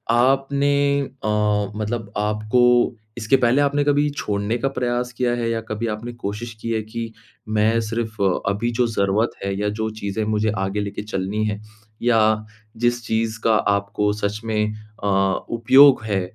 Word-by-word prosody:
आपने 140 +2 +2
अ, 105 -6 -1
मतलब 110 0 -3
आपको 110 +4 +2 0.2
इसके 115 +3 +2
पहले 125 +3 +3
आपने 145 0 +2
कभी 145 0 +2
छोड़ने 105 -5 -2
का 135 - -1
प्रयास 125 -2 -2
किया 125 0 0
है 120 -1 -1
या 115 0 0
कभी 110 +1 -4
आपने 115 +3 -6
कोशिश 115 +1 -5
की 115 - -4
है 110 -1 0
कि 115 +1 -6 0.4
मैं 110 +1 +2
सिर्फ़ 110 -1 -4 0.3
अभी 105 +4 -1
जो 120 +1 +1
ज़रूरत 105 +1 +1
है 100 0 -1
या 105 0 0
जो 110 0 0
चीज़ें 100 +1 -2
मुझे 110 0 +1
आगे 95 +2 -1
लेके 100 0 -4
चलनी 105 +1 -2
है, 105 -1 -2 0.4
या 110 -2 +3 0.3
जिस 120 +1 +1
चीज़ 110 0 -1
का 110 - +4
आपको 100 0 +1
सच 105 0 -2
में 105 -1 0 0.3
अ, - - 0 0.4
उपयोग 130 +2 +6
है 100 -3 0
110 Hz, 160 wpm, -22 LUFS, 105-120 Hz, 0.4 s, उपयोग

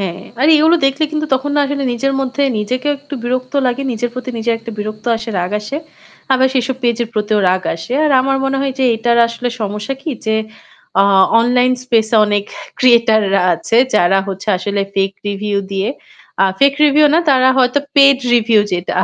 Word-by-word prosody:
হ্যাঁ, 185 -1 -4 0.2
আর 285 - +3
এগুলো 315 +3 +4
দেখলে 275 +3 0
কিন্তু 310 0 -2
তখন 265 +2 -2
না - - +3
আসলে 280 0 -3
নিজের 275 +3 -1
মধ্যে 270 +1 -2 0.2
নিজেকেও 255 +7 -2
একটু 285 +1 -9
বিরক্ত 255 +1 -3
লাগে। 250 +2 -1
নিজের 235 +1 -3
প্রতি 255 0 -6
নিজের 230 +1 0
একটা 230 +1 -9
বিরক্ত 215 +1 -6
আসে, 225 +1 -8
রাগ 180 +1 -2
আসে। 215 +7 -6 0.6
আবার 260 0 +3
সেসব 260 0 -1
পেজের 235 -1 0
প্রতিও 210 0 0
রাগ 185 +1 0
আসে। 165 +8 -8
আর 305 - +1
আমার 270 +1 0
মনে 270 0 -1
হয় 275 -1 -1
যে 265 - +1
এটার 235 +1 +1
আসলে 235 +1 -4
সমস্যা 210 +4 -4
কি 315 - -4 0.2
যে, 220 - +1 0.7
আ - - +6 0.4
online 250 +2 +2
space 225 -3 +1
এ - - +5
অনেক 205 -1 -1 0.3
creator 235 -3 +4
রা - - +3
আছে 225 - -2 0.2
যারা 185 +2 +3
হচ্ছে 195 +2 -7
আসলে 200 +2 -3
fake 195 0 -1
review 205 0 -2
দিয়ে 195 +2 -2 0.5
আ - - +5 0.2
fake 280 0 +4
review 300 +1 +4
না - - +4
তারা 260 -1 +4
হয়তো 250 +2 +2 0.2
paid 275 -1 +6 0.2
review 225 -2 +3
যেটা 180 0 -3
240 Hz, 190 wpm, -15 LUFS, 210-270 Hz, 0.7 s, আ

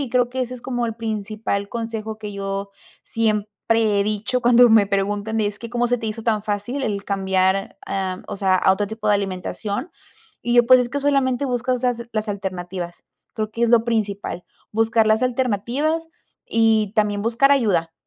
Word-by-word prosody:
y 265 -5 -3
creo 245 -1 +2
que 260 +1 -4
ese 255 0 -3
es 250 - -10
como 245 -2 -2
el 225 0 -5
principal 215 -2 -3
consejo 220 -2 -5
que 210 -1 -6
yo 195 0 -4 0.3
siempre 215 -2 0 0.5
he - - +4
dicho 215 +5 -1
cuando 240 0 +6
me 215 -3 +5
preguntan 205 +2 -1
es 205 0 -2
que 235 -1 -7
cómo 240 0 +1
se 245 +1 +1
te 225 - -5
hizo 220 +1 -5
tan 215 -3 +1
fácil 215 +6 -3
el 200 -3 -2
cambiar, 190 -1 0
em, 190 -1 -3
o - - -5
sea, 190 -1 +2
a 190 - +4
otro 205 +1 -1
tipo 220 0 -6
de 210 - +5
alimentación. 200 - -3 0.6
Y 240 - +1
yo, 240 -1 +6
pues, 255 +1 +8
es 245 -1 -1
que 285 - -2
solamente 275 -2 +1
buscas 250 0 -1
las 245 -2 0
las 215 0 -2
alternativas. 185 -3 -5 0.3
Creo 215 -1 -3
que 230 +2 -4
es 235 - +3
lo 230 -1 +5
principal, 205 -6 -2 0.3
buscar 225 0 +2
las 220 +3 +3
alternativas 255 +6 0 0.4
y 220 -2 +2
también 205 -2 +1
buscar 235 +5 +3
ayuda. 185 -12 +1
220 Hz, 190 wpm, -22 LUFS, 200-240 Hz, 0.6 s, pues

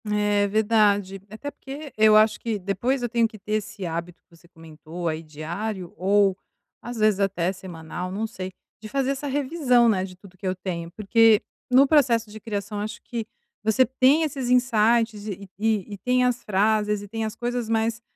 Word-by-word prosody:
É, 205 -1 +1
verdade. 205 -2 +2
Até 220 +8 -7
porque 280 +2 -9
eu 215 0 +6
acho 215 0 +4
que 225 -2 -2
depois 205 +7 -1
eu 240 - -1
tenho 230 -1 +2
que 220 -1 -13
ter 210 +1 -6
esse 210 -2 -3
hábito 170 +1 -5
que 170 - -23
você 175 +1 -21
comentou 165 0 -8
aí 160 0 -2
diário 170 +5 -5
ou 195 +1 +3 0.5
às 240 0 -7
vezes 215 -2 +3
até 190 -2 0
semanal, 180 -1 -7
não 210 +4 -2
sei, 190 -4 -6 0.3
de 215 - -8
fazer 270 +2 0
essa 275 +1 -4
revisão, 265 -3 +2
né, 195 -5 +2
de 185 -1 -8
tudo 185 0 -17
que 185 +1 -6
eu 185 - 0
tenho. 170 -3 -5
Porque 220 +2 +4 0.3
no 260 +2 +7
processo 240 -7 +3
de 215 - -9
criação, 205 -1 -4
acho 215 +2 -5
que 230 -3 -5 0.4
você 220 +4 +4
tem 265 +5 +3
esses 275 -5 -3
insights 230 -3 +2
e 200 -1 -6
e 210 -2 -1
tem 250 +2 +2
as 245 -1 0
frases 210 +1 +1
e - - -9
tem 225 +2 -4
as 220 0 -4
coisas, 240 -1 -3
mas 225 +1 0
215 Hz, 190 wpm, -24 LUFS, 190-235 Hz, 0.5 s, no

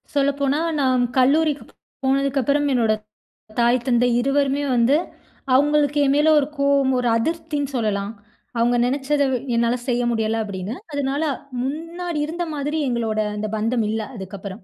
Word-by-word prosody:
சொல்லப்போனா, 280 0 +1 0.2
நான் 255 -2 +2
கல்லூரிக்கு 290 +3 +3 0.4
போனதுக்கப்றம், 275 +1 +1
என்னோட 225 -3 +3 0.7
தாய், 240 +1 +3
தந்தை 245 -1 +3
இருவருமே 275 +2 +1
வந்து, 245 +4 +4 0.6
அவுங்களுக்கு 295 +1 +3
என் 275 - +3
மேல 300 +2 +4
ஒரு 280 - -1
கோவம், 280 -1 +3
ஒரு 245 - 0
அதிருப்தினு 295 +2 -2
சொல்லலாம். 210 -3 -1 0.4
அவங்க 235 +1 +2
நினைச்சத, 280 +3 0 0.3
என்னால 235 +1 +2
செய்ய 245 0 +1
முடியல, 225 -1 0
அப்டின்னு. 200 +2 -5 0.2
அதனால, 285 +1 -1 0.4
முன்னாடி 330 +4 -4
இருந்த 340 +3 -3
மாதிரி 295 +2 -2
எங்களோட 230 -3 -1 0.2
அந்த 210 +1 -3
பந்தம் 225 +1 0
இல்ல, 220 +1 -1
அதுக்கப்பறம். 195 0 -8
265 Hz, 130 wpm, -22 LUFS, 235-285 Hz, 0.7 s, வந்து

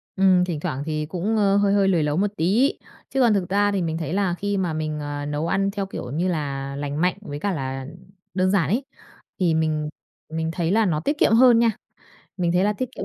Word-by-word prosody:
Ừm, 185 -2 +4
thỉnh 165 -5 -3
thoảng 145 -5 -3
thì 155 -1 -2
cũng, 180 +7 -2
ơ, 200 -1 +3
hơi 200 0 +3
hơi 200 -1 +3
lười 170 -5 +2
nấu 150 +2 0
một 205 +1 +1
tí. 210 - +3 0.4
Chứ 270 - 0
còn 235 -3 +5
thực 190 -4 -1
ra 205 +1 +2
thì 195 -2 0
mình 160 -1 -2
thấy 165 0 -4
là 195 -2 +1
khi 205 0 -1
mà 175 -4 -1
mình, 155 -1 -3
ờ, 145 0 -4
nấu 150 +2 -2
ăn 195 +3 +1
theo 200 -1 -3
kiểu 125 -10 -7
như 165 +6 0
là 140 -5 -3
lành 145 +2 -3
mạnh 180 0 +2
với 145 -8 -6
cả 200 +5 -1
là 135 -2 -4 0.5
đơn 185 +1 +1
giản 180 -8 +2
ấy 245 +8 0 0.5
thì 175 -4 +2
mình 155 -1 0 0.4
mình 160 0 -2
thấy 170 0 -1
là 220 +2 +3
nó 160 -6 +1
tiết 290 - -1
kiệm 225 - +3
hơn 240 0 +6
nha. 230 -1 +4 0.7
Mình 175 -2 0
thấy 180 +2 +3
là 210 - +2
tiết 255 +5 -3
kiệm - - -4
180 Hz, 245 wpm, -23 LUFS, 155-200 Hz, 0.7 s, hơn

